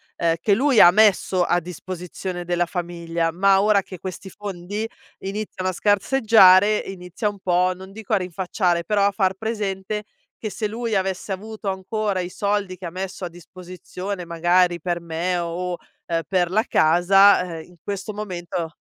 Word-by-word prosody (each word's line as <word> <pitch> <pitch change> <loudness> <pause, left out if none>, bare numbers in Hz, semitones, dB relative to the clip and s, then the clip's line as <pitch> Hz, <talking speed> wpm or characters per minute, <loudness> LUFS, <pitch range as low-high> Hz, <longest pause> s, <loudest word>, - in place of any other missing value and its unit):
ehm, 165 -1 +1
che 205 - +2
lui 260 +1 +3
ha 175 - +10
messo 195 -3 +3
a 175 0 +2
disposizione 180 +1 -6
della 175 0 +1
famiglia. 170 -1 -3
Ma 195 +3 +4
ora 205 -1 +4
che 190 -2 -11
questi 190 +1 -7
fondi, 205 +2 -5 0.3
iniziano 195 -1 -4
a - - -3
scarseggiare, 205 -1 +5
inizia 180 +1 -5
un 205 -1 -4
po', 180 0 +2
non 190 +1 -11
dico 215 +1 -6
a - - +5
rinfacciare, 180 -1 -1
però 200 +2 +2
a 200 - +3
far 190 -2 +1
presente, 210 -1 -3 0.4
che 215 - -4
se 215 - -2
lui 225 +1 -3
avesse 190 +1 -2
avuto 215 +2 -8
ancora 195 +1 -2
i 180 0 -3
soldi 200 -1 -2
che 185 - -9
ha 170 - -5
messo 185 +1 -5
a - - -5
disposizione, 180 +2 -8
magari 175 +1 +2
per 175 +1 -2
me, 170 +2 -2
o, 175 +1 -3 0.3
ehm, 165 -1 -1
per 180 -3 +1
la 215 +3 +2
casa, 180 0 +4
ehm, - - -9
in 180 - -19
questo 200 +1 -4
momento 175 -5 -5
185 Hz, 170 wpm, -22 LUFS, 175-205 Hz, 0.4 s, ha